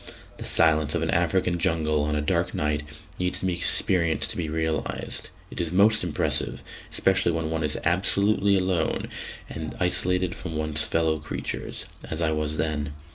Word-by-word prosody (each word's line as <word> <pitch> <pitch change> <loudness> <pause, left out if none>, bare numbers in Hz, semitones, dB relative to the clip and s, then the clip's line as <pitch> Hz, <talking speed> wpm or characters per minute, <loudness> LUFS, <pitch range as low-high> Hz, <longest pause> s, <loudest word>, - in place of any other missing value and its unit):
The - - -7
silence 80 -2 +3
of - - 0
an - - 0
African 90 -2 +1
jungle 80 -2 +2
on 75 0 -1
a 75 - 0
dark 75 - 0
night 75 0 0 0.4
needs 90 0 +1
to - - -2
be 90 - +1
experienced 85 -1 +2
to - - -6
be 80 -3 -2
realised; 80 0 -2 0.2
it - - -4
is 85 -2 -2
most 105 +3 +4
impressive, 85 -4 0 0.3
especially 95 -2 +2
when 80 -1 -2
one 80 -1 -1
is 75 -1 -1
absolutely 100 +3 +3
alone 90 -3 0 0.4
and 80 -1 -6
isolated 90 0 +2
from 80 -2 -7
one's 75 -1 +1
fellow 80 -1 +1
creatures, 75 - -5 0.2
as 80 - -3
I 80 -2 +1
was 75 0 -1
then. 75 -2 -2
80 Hz, 170 wpm, -25 LUFS, 75-90 Hz, 0.4 s, most